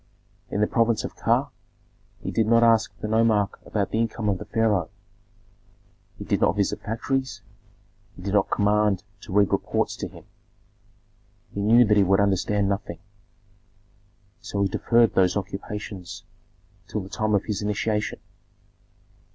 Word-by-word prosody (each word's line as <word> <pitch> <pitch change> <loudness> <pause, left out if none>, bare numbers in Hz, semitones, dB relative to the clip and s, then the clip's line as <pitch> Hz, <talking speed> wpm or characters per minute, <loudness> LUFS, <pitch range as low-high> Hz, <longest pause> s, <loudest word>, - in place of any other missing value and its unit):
In 105 - -1
the - - +5
province 115 -1 +1
of - - -6
Ka - - +1 0.7
he - - -4
did 110 -1 +1
not 115 +1 +5
ask 115 -1 +4
the - - -2
nomarch 110 -2 +2 0.2
about 100 -3 -1
the 110 - 0
income 115 -2 -1
of 95 -2 0
the - - -7
pharaoh, 110 -7 +1 1.3
he - - -7
did - - 0
not 85 - +3
visit 100 -1 -1
factories, 115 +1 -3 0.7
he 90 - -12
did 100 0 -3
not 100 -2 +2
command 105 -1 +2 0.2
to 100 - -11
read 100 0 +3
reports - - 0
to - - -4
him; - - -14 1.3
he 100 - -3
knew 115 +4 +6
that 105 -1 +3
he 100 - +6
would 95 +1 +3
understand 100 0 +1
nothing, 100 -4 -3 1.4
so 100 -1 -2
he - - +2
deferred 115 +4 +2
those 90 0 +3
occupations 100 -1 -6 0.6
till 105 - -3
the 95 - -8
time 110 0 0
of 100 - 0
his 105 -2 -3
initiation. 105 +1 -1
105 Hz, 150 wpm, -24 LUFS, 100-110 Hz, 1.4 s, knew